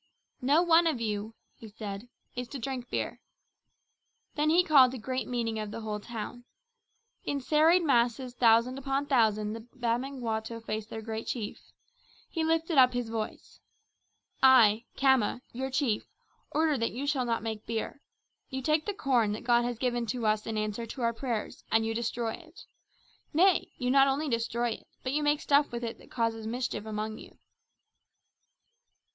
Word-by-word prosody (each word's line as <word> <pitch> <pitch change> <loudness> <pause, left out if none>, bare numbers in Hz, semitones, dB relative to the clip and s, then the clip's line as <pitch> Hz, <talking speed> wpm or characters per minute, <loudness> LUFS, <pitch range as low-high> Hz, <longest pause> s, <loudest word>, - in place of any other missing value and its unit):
"No 290 +7 +4
one 335 -1 +5
of 305 -7 0
you," 215 0 -3 0.2
he 225 - -11
said, 210 +1 -7 0.3
"is 250 0 -4
to 280 - -6
drink 250 0 -5
beer." - - -3 1.1
Then 300 0 +1
he 345 +3 +5
called 270 -7 +6
a - - -5
great 255 +3 -3
meeting 230 -3 -2
of 215 -1 -4
the 220 - -6
whole 210 -1 -3
town. 235 +2 -7 0.8
In 285 - -2
serried 315 +6 +4
masses 245 -3 +1
thousand 240 +2 +3
upon 275 +1 -1
thousand 215 -6 +2
the 225 - -5
Bamangwato 235 -1 -3
faced 220 -1 -5
their 220 - -6
great 220 0 -5
chief. 220 -5 -5 0.6
He 330 - -2
lifted 325 -1 +2
up 255 -1 +6
his 245 -2 -2
voice: 225 -1 -5 0.8
"I, 235 -4 +6
Khama, 265 -3 +3
your 265 +2 -3
chief, 255 -5 0 0.4
order 305 -3 +1
that 230 - -1
you 265 +4 -4
shall 280 -3 +1
not 230 -2 -1
make 220 -1 -5
beer. 230 +5 -3 0.5
You 265 -1 -4
take 305 +2 +1
the 410 - -2
corn 245 - +2
that 215 - -6
God 240 0 +3
has 245 -1 -2
given 240 -1 -1
to 240 0 -2
us 215 0 +1
in 220 -1 -2
answer 215 +2 -2
to 250 +2 -6
our 235 0 +2
prayers 230 -3 -4
and 225 0 +3
you 225 - -1
destroy 230 0 -2
it. 335 -1 -13 0.7
Nay, 365 +2 +4
you 250 -1 0
not 275 0 +6
only 280 +3 0
destroy 235 0 0
it, - - -8 0.2
but 255 - -2
you 300 - +1
make 295 0 +2
stuff 285 0 +3
with 240 0 -4
it 230 -1 -4
that - - -17
causes 225 -2 -1
mischief 235 -2 -3
among 215 +1 -4
you." - - -14
240 Hz, 175 wpm, -29 LUFS, 225-275 Hz, 1.1 s, called